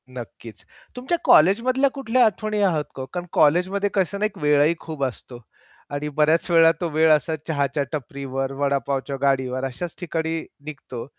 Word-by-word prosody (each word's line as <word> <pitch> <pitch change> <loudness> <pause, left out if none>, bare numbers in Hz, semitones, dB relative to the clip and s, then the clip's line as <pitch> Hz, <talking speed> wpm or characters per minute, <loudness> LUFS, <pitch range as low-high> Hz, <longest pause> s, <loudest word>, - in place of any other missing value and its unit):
नक्कीच, 115 -5 -10 0.3
तुमच्या 260 +8 -2
कॉलेजमधल्या 250 - +4
कुठल्या 255 -2 +2
आठवणी 215 0 -1
आहात 170 -7 +2
का 135 - -6
ओ? - - -5
कारण 175 -1 -4
कॉलेजमध्ये 180 +6 +2
कसं 200 0 0
ना 210 - +1
एक 215 - -4
वेळही 150 0 +3
खूप 155 -4 -6
असतो 125 -1 -6 0.5
आणि 145 +1 -3
बऱ्याच 155 +4 +2
वेळा 165 -1 +6
तो 170 - -1
वेळ 160 +1 +3
असा 155 +1 +2
चहाच्या 145 -2 -1
टपरीवर, 135 -2 -4
वडापावच्या 140 0 -1
गाडीवर 130 -2 0
अशाच 155 +6 -6
ठिकाणी 165 -2 -2 0.3
निघतो. 135 -5 -8
155 Hz, 155 wpm, -23 LUFS, 140-185 Hz, 0.5 s, वेळा